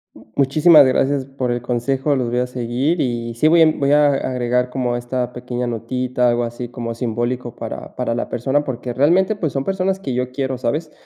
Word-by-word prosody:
M - - -16
muchísimas 150 +2 +6
gracias 135 +1 +1
por 135 -2 -3
el 120 - -3
consejo, 130 +4 0
los 125 -2 -1
voy 120 +1 0
a 125 - 0
seguir 125 +6 -1
y 120 -3 -2
sí 135 +7 +2
voy 165 +1 +5
a 160 -1 +6
voy 140 -2 0
a 150 0 +5
agregar 125 -2 0
como 125 -1 -1
esta 125 0 -3
pequeña 125 0 -4
notita, 125 +2 -1
algo 120 0 +1
así 120 +1 -5
como 120 -1 -5
simbólico 120 +1 -3
para - - -7
para 125 -2 -1
la 120 - -2
persona, 135 +5 0
porque, 125 -1 -4
realmente 175 - +3
pues 160 -7 -2
son 135 - -1
personas 190 +2 -1
que 135 -10 -4
yo 125 +1 -2
quiero, 130 0 -2
¿sabes?, 150 +6 -2
125 Hz, 205 wpm, -20 LUFS, 120-140 Hz, -, muchísimas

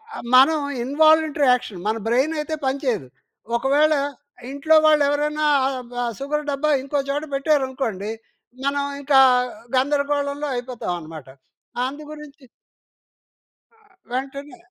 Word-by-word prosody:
ఆ! - - -6 0.2
మనం 275 +5 +6 0.3
involuntary 310 +2 +3
action 220 -6 -3
మన 220 +1 0
బ్రైన్ 260 +7 +2
అయితే 300 +1 -3
పని 265 +1 0
చేయదు. 225 - -1 0.5
ఒకవేళ 285 +5 +3 0.6
ఇంట్లో 285 +3 +2
వాళ్ళు 305 -1 +5
ఎవరైనా 300 +1 0 0.2
ఆహ్, 255 -3 -7 0.3
సుగర్ 300 +2 -3
డబ్బా 285 +2 0
ఇంకో 280 +1 -1
చోట 290 +2 -1
పెట్టారనుకోండి. 265 -8 -1 0.5
మనం 280 0 0 0.2
ఇంకా 275 -1 +4 0.6
గందరగోళంలో 285 +1 0
అయిపోతామన్నమాట. 175 - -6 0.6
అందు 285 +4 -6
గురించి 300 -1 -12 1.7
వెంటనే 275 +4 -5
280 Hz, 105 wpm, -22 LUFS, 255-300 Hz, 1.7 s, మనం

